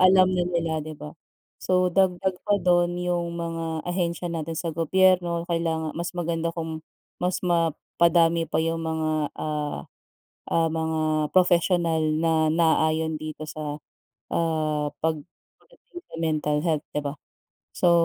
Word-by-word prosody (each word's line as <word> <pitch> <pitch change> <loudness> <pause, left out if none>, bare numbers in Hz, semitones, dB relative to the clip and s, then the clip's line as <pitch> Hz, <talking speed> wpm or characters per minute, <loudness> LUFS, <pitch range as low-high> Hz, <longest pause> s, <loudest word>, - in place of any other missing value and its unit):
alam 185 0 +6
na 180 -1 +1
nila 165 -2 -1
'di 155 0 -7
ba 150 +1 -9 0.5
so 185 0 +3
dagdag 190 0 +1
pa 205 -1 +2
dun 175 0 +2
yung 175 -1 -2
mga 165 -1 -3
ahensiya 175 -1 -1
natin 165 -1 -3
sa 165 +1 -3
gobyerno 170 +1 +2
kailangan 160 -2 -1
mas 170 +2 -3
maganda 170 -1 -2
kung 160 -1 -5 0.3
mas 180 0 -1
mapadami 170 -1 +2
pa 160 - -2
yung 165 0 -1
mga, 155 -2 -1
ah, 150 -1 -3 0.7
ah, 165 -1 +3
mga 160 0 -1 0.4
professional 175 -2 +3 0.2
na 160 -1 +2
naayon 160 -1 +2
dito 155 0 -7
sa 150 -1 -5 0.5
ah, 155 -3 0
pagdating 170 - -7
sa - - -17
mental 150 -2 0
health 155 -2 +1
'di 150 - -1
ba 140 0 -4 0.6
so. 175 - +4
165 Hz, 135 wpm, -25 LUFS, 160-175 Hz, 0.7 s, alam